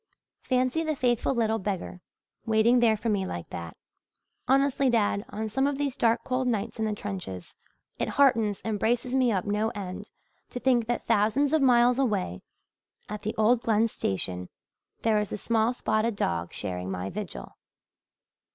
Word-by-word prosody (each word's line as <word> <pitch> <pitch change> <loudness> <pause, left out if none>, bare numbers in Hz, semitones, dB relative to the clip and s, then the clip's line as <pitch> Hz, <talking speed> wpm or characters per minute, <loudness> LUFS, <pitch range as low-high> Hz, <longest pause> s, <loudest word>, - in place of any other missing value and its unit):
Fancy 255 +4 +1
the 315 -1 -1
faithful 250 0 +1
little 225 -1 +1
beggar 190 -2 -4 0.5
waiting 225 +3 +4
there 225 -2 +4
for 225 - -4
me 205 -3 +1
like 85 - -6
that! 85 -1 -7 0.7
Honestly, 275 0 +3
dad, 210 -3 +1
on 220 +1 -4
some 265 +6 +1
of 285 -1 -1
these 280 -2 -1
dark 230 0 +2
cold 255 0 -1
nights 225 -1 -2
in 220 - +1
the 215 -1 -1
trenches, 185 - -6 0.4
it - - 0
heartens 230 -7 +2
and 215 -2 -1
braces 240 +3 0
me 255 -2 +3
up 190 -4 -1
no 210 +2 0
end 185 -3 -6 0.4
to 245 - -5
think 245 -3 +2
that 240 - -2
thousands 230 +7 +2
of 315 - +3
miles 245 -1 +4
away 200 - -1 0.7
at 210 0 -5
the 215 - -3
old 225 +2 +4
Glen 225 0 +2
station 90 - -3 0.5
there 220 -2 +3
is 210 - -5
a - - -2
small 225 +2 +1
spotted 220 -2 0
dog 85 - -1
sharing 90 0 -4
my 90 0 -4
vigil. 205 -2 -7
220 Hz, 170 wpm, -27 LUFS, 205-245 Hz, 0.7 s, waiting